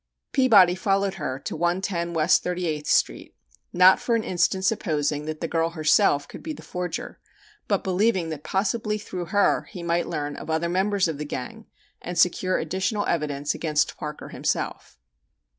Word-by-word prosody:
Peabody 215 -10 +6
followed 195 +1 0
her 130 - -2
to 135 - -6
110 175 0 -1
West 160 +2 +4
Thirty 180 0 -2
eighth 150 -2 -3
Street, - - +1 0.4
not 180 +1 +6
for 235 - 0
an 225 - 0
instant 190 +1 0
supposing 150 -8 0
that 155 0 -5
the 165 - -1
girl 165 0 0
herself 155 -3 +2
could - - -10
be 315 - -5
the - - -11
forger, 180 0 -5 0.5
but 200 -2 0
believing 190 -2 +1
that 155 -2 -6
possibly 210 +2 -1
through 185 -4 -6
her 205 +3 +2
he 180 - -8
might 170 0 0
learn 145 -3 -3
of - - -9
other 160 +2 0
members 190 +1 +1
of 155 -3 -4
the - - -2
gang 180 - -7 0.3
and 175 0 -6
secure 185 +1 +2
additional 190 +6 -1
evidence 145 -3 -1
against 150 -2 0
Parker 150 0 -7
himself. - - -3
175 Hz, 170 wpm, -25 LUFS, 155-195 Hz, 0.5 s, Peabody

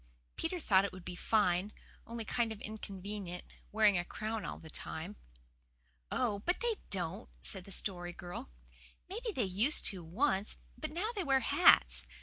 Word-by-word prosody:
Peter 350 +2 -1
thought 195 - +5
it 200 - -1
would 185 -1 -10
be 180 - -5
fine, 195 -1 +2 0.4
only 230 -1 -4
kind 235 0 +1
of 220 - -6
inconvenient, 200 -3 -5 0.3
wearing 210 -3 +5
a - - 0
crown 215 +3 -3
all - - -4
the 160 - -12
time. 160 +4 -5 1.0
"Oh, 215 -5 +1
but 355 - 0
they 470 -3 +1
don't," 190 +2 -2
said 190 -3 -2
the 195 - -11
Story 175 -2 0
Girl. 175 - -7 0.6
"Maybe 450 +5 -3
they 260 - 0
used 210 +10 +2
to 185 -3 -7
once, 200 - +1 0.2
but 310 - -4
now 360 +9 -1
they 395 - 0
wear 270 -3 +4
hats. - - +6
205 Hz, 165 wpm, -34 LUFS, 180-245 Hz, 1.0 s, hats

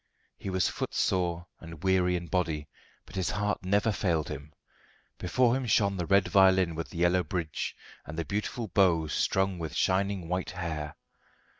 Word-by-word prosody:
He - - -6
was 95 0 +2
footsore 85 -2 -1
and 85 -1 -10
weary 90 -1 +3
in 85 -1 -3
body, 80 -4 -1 0.4
but 85 - -13
his 95 -3 0
heart 105 0 -1
never 100 +4 +2
failed 90 -5 0
him. 75 0 -7 0.7
Before 120 +7 +2
him 130 -2 -2
shone 100 -3 +3
the 90 -2 -2
red 100 -2 +4
violin 95 -2 +5
with 80 +1 -5
the - - -9
yellow 90 +1 +3
bridge, 80 -1 -3 0.3
and 80 - -8
the 85 - -1
beautiful 105 +3 -3
bow 90 -5 +3
strung 95 +4 0
with 80 -2 -5
shining 95 -1 +1
white 90 +2 -2
hair. 80 -5 -4
90 Hz, 165 wpm, -29 LUFS, 85-95 Hz, 0.7 s, violin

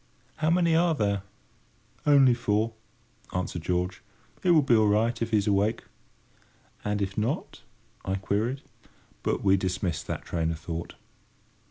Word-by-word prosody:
How 155 0 +1
many 170 -1 +3
are 165 0 +3
there?" 100 -5 0 0.9
"Only 135 -3 +6
four," 115 -1 0 0.6
answered 90 -2 -2
George. 90 +2 -1 0.4
"It 180 - +1
will 160 -4 +6
be 125 -3 +4
all 110 -1 +4
right, 115 +3 +1
if 115 - 0
he's 105 -3 +2
awake." 105 +2 +1 1.0
"And 105 -1 0
if 95 +1 -3
not?" 125 - -2 0.4
I 95 - -1
queried; 110 +8 -1 0.6
but - - -1
we 95 -1 +5
dismissed 90 -3 -2
that - - -4
train 80 -2 -1
of 80 - -2
thought. 85 0 -6
105 Hz, 145 wpm, -27 LUFS, 95-125 Hz, 1.0 s, Only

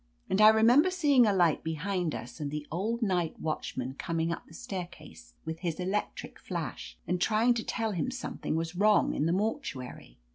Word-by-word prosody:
And 190 - +3
I 215 - +9
remember 235 +10 +5
seeing 290 -10 +4
a - - +4
light 175 -5 +2
behind 165 +1 -2
us 120 - -8
and 145 -2 -3
the 150 0 -5
old 220 +8 -1
night 180 -5 0
watchman 130 -4 -3
coming 165 +3 -2
up 170 - -5
the - - -16
staircase 175 - -8
with 160 0 -5
his 170 -2 -3
electric 190 +3 -3
flash, - - -6
and 180 0 -1
trying 225 +4 +3
to 230 -1 -3
tell 225 -2 -2
him 190 +5 -1
some 255 -1 -6
thing - - -2
was 165 +1 -2
wrong 210 +3 +3
in 150 - 0
the - - +1
mortuary. 180 - -3
180 Hz, 190 wpm, -29 LUFS, 160-220 Hz, -, I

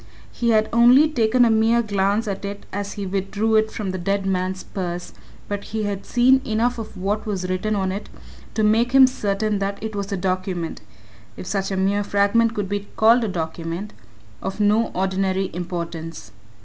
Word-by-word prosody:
He 235 - -1
had 220 -1 +3
only 245 +6 +7
taken 245 -3 +3
a 230 - +3
mere 225 +2 +3
glance 205 +1 0
at 195 -1 -4
it 200 0 -6
as 200 0 -3
he 200 - -5
withdrew 200 +3 -1
it 220 0 +3
from 205 -4 -4
the 185 - -4
dead 195 +2 -1
man's 185 0 -1
purse, 175 -2 -5 0.3
but 205 0 -4
he 220 0 -3
had 200 -1 -4
seen 260 +2 +4
enough 235 +2 0
of 215 -3 -8
what 205 +4 -2
was 190 -3 -2
written 185 +4 -1
on 190 -2 0
it 200 +2 -6 0.5
to 220 - +1
make 225 +4 +3
him 270 -1 +9
certain 210 -4 -1
that 200 0 -2
it 220 -1 -5
was 200 0 -4
a 200 - -1
document 185 - -2 0.6
if - - -7
such 195 +1 -2
a 190 - -2
mere 200 +2 +1
fragment 205 +3 +2
could 205 -2 -2
be 205 +1 -3
called 230 +2 +5
a - - 0
document 170 +2 -4 0.5
of 190 +2 -5
no 210 +2 +3
ordinary 190 0 0
importance. 165 - -5
200 Hz, 190 wpm, -22 LUFS, 190-220 Hz, 0.6 s, him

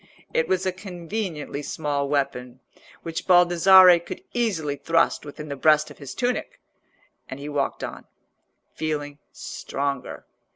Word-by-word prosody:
It 160 - +1
was 185 +1 0
a 185 - +1
conveniently 180 -4 -5
small 145 -1 -2
weapon, 130 -3 -2 0.4
which 165 -1 -5
Baldassarre 180 0 +7
could 170 - -9
easily 185 -12 -1
thrust 165 +3 +1
within 150 +1 -8
the 140 - -4
breast 150 +2 +3
of - - -15
his 140 -3 -8
tunic, 250 0 -2 0.7
and 135 - -7
he 145 - -7
walked 145 -2 -2
on, - - -7 0.7
feeling 145 -2 -4
stronger. 140 -1 -5
155 Hz, 130 wpm, -24 LUFS, 145-180 Hz, 0.7 s, Baldassarre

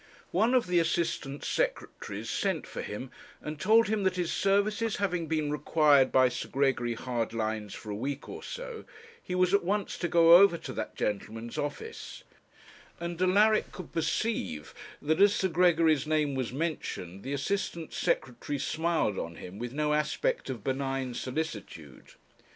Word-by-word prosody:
One 225 +8 +3
of 250 - +3
the 180 -1 +2
Assistant 160 -4 -1
Secretaries - - -2
sent - - -1
for - - -6
him, - - -6 0.3
and 150 -1 -6
told 220 +5 +5
him 215 0 0
that 190 -1 +1
his 175 -2 -1
services 205 +3 +1
having 180 -5 -1
been 155 -2 0
required 150 -2 +4
by 130 -1 +5
Sir 125 0 -4
Gregory 130 -4 +1
Hardlines 110 -3 -3
for 105 - -8
a - - -3
week 135 +6 -4
or - - -7
so, - - -7 0.4
he 180 - -4
was 185 0 +3
at 200 - +4
once 200 +2 -1
to 175 - 0
go 170 0 +8
over 195 -2 +6
to 135 -5 -7
that - - -5
gentleman's 110 +3 -3
office; 145 - -6 0.8
and 170 0 -4
Alaric 210 +4 +4
could 185 -4 -9
perceive 155 - -2 0.3
that, 160 +5 +1
as 205 0 +6
Sir 190 - +1
Gregory's 165 -4 +3
name 155 -2 +1
was 130 -3 -2
mentioned, 125 - -4
the 135 - -4
Assistant 170 +2 -2
Secretary 130 +3 -1
smiled 160 - 0
on 85 0 -5
him 90 +5 -9
with 120 0 -4
no 150 +2 0
aspect 150 -2 0
of 120 -6 -5
benign 135 -1 -2
solicitude. 115 - -6
155 Hz, 160 wpm, -29 LUFS, 130-185 Hz, 0.8 s, go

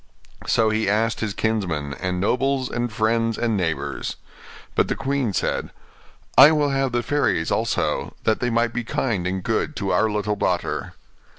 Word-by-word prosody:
So 110 -1 +3
he 110 -2 +1
asked 110 +2 +1
his 105 -3 -3
kinsmen, 90 -12 -1
and 90 +3 -3
nobles, 130 +5 0
and 120 -1 -2
friends, 115 0 +1
and 115 -2 0
neighbours. 85 -5 -2 0.6
But - - +2
the - - -1
queen 135 -4 -1
said, - - -1 0.7
'I 140 +4 +10
will 150 -2 +2
have 135 -1 0
the 120 0 0
fairies 115 - 0
also, - - -1
that 110 - +2
they 125 - 0
might 115 0 +1
be 120 - -2
kind 110 -6 -1
and 95 0 -3
good - - -1
to - - -2
our 110 - +3
little 105 0 -1
daughter. 90 -3 -2
110 Hz, 170 wpm, -23 LUFS, 100-120 Hz, 0.7 s, I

